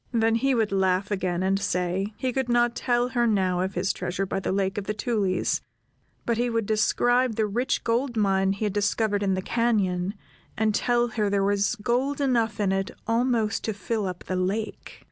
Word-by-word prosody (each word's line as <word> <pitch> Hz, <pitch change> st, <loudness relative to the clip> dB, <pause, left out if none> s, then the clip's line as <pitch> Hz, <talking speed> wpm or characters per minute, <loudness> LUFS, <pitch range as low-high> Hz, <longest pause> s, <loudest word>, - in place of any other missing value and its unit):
Then 225 Hz, -2 st, +2 dB
he 265 Hz, +3 st, +2 dB
would 220 Hz, -3 st, +1 dB
laugh 190 Hz, 0 st, +1 dB
again, 185 Hz, -2 st, -1 dB
and 195 Hz, +1 st, +1 dB
say, 190 Hz, 0 st, -1 dB
he 255 Hz, -1 st, -2 dB
could 265 Hz, -1 st, -1 dB
not 240 Hz, 0 st, +2 dB
tell 245 Hz, 0 st, +1 dB
her 240 Hz, -2 st, +1 dB
now 190 Hz, -4 st, +1 dB
of 190 Hz, +1 st, -2 dB
his 180 Hz, +2 st, 0 dB
treasure 180 Hz, +2 st, -3 dB
by 195 Hz, -, -2 dB
the -, -, -2 dB
Lake 195 Hz, +1 st, 0 dB
of 200 Hz, -, -7 dB
the 210 Hz, -, -2 dB
Tulies, 205 Hz, -5 st, 0 dB, 0.6 s
but 235 Hz, -1 st, 0 dB
he 245 Hz, 0 st, +1 dB
would 230 Hz, -2 st, 0 dB
describe 245 Hz, +3 st, +2 dB
the 220 Hz, -, +1 dB
rich 240 Hz, +6 st, -1 dB
gold 235 Hz, +1 st, 0 dB
mine 195 Hz, -2 st, +2 dB
he 200 Hz, +2 st, -3 dB
had 205 Hz, -, -1 dB
discovered 205 Hz, 0 st, +1 dB
in 195 Hz, -2 st, +1 dB
the 185 Hz, -, -3 dB
cañon, 200 Hz, -6 st, 0 dB, 0.4 s
and 220 Hz, 0 st, +2 dB
tell 240 Hz, +2 st, +1 dB
her 215 Hz, -2 st, 0 dB
there 200 Hz, -1 st, +1 dB
was 205 Hz, +3 st, +1 dB
gold 245 Hz, +6 st, -1 dB
enough 235 Hz, -6 st, +1 dB
in 200 Hz, -2 st, +1 dB
it 195 Hz, 0 st, -1 dB, 0.2 s
almost 230 Hz, -1 st, +1 dB
to 220 Hz, -, -1 dB
fill 205 Hz, +1 st, -2 dB
up 180 Hz, -1 st, -6 dB
the 185 Hz, -, -3 dB
lake. 195 Hz, +4 st, -3 dB
210 Hz, 200 wpm, -26 LUFS, 195-235 Hz, 0.6 s, Then